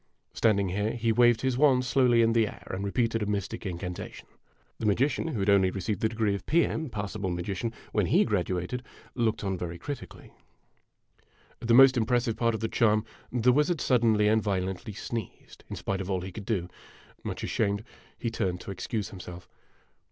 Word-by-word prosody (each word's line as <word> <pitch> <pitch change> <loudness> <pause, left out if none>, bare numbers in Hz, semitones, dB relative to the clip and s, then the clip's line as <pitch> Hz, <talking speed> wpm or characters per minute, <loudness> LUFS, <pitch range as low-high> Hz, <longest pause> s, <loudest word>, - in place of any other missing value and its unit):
Standing 100 -4 +2
here, 105 +4 -1
he 115 -1 0
waved 120 0 +4
his 130 -1 0
wand 130 -4 +4
slowly 125 -3 +4
in 115 0 +3
the 115 -2 +3
air - - -10
and 95 +1 -3
repeated 115 +2 0
a 105 - -1
mystic 105 +1 -3
incantation. 90 0 -6 0.5
The 110 - -1
magician, 130 +10 +1
who 130 -10 -3
had 95 - +1
only 95 -2 +5
received 95 +2 -3
the 110 - +2
degree 110 -2 0
of 100 - -4
P. 170 +2 +4
M. 160 -3 -3
(Passable 105 -2 -4
Magician) 95 +5 -3 0.2
when - - +1
lie - - +5
grad - - 0
uated, 90 +7 -3 0.3
looked 110 -4 0
on 95 -2 -2
very 85 -1 -4
critically. 140 +6 -8 1.3
At - - -5
the 115 - +5
most 135 0 +8
impressive 120 0 +1
part 115 -1 +1
of 110 - -5
the 110 - 0
charm, 110 -3 +2 0.3
the 125 0 +3
wizard 150 +4 +2
suddenly 115 -5 +3
and 110 +1 +3
violently 95 0 -2
sneezed, 110 0 -7
in - - -5
spite 95 -1 -3
of 95 - -6
all 95 -2 0
he 95 +1 -6
could 105 -1 -9
do. 95 -7 -1 0.6
Much - - -5
ashamed, 100 0 0 0.3
he 115 - -3
turned 95 -6 -1
to - - -7
excuse 105 +2 -3
himself. 90 -2 -9
110 Hz, 190 wpm, -28 LUFS, 95-120 Hz, 1.3 s, most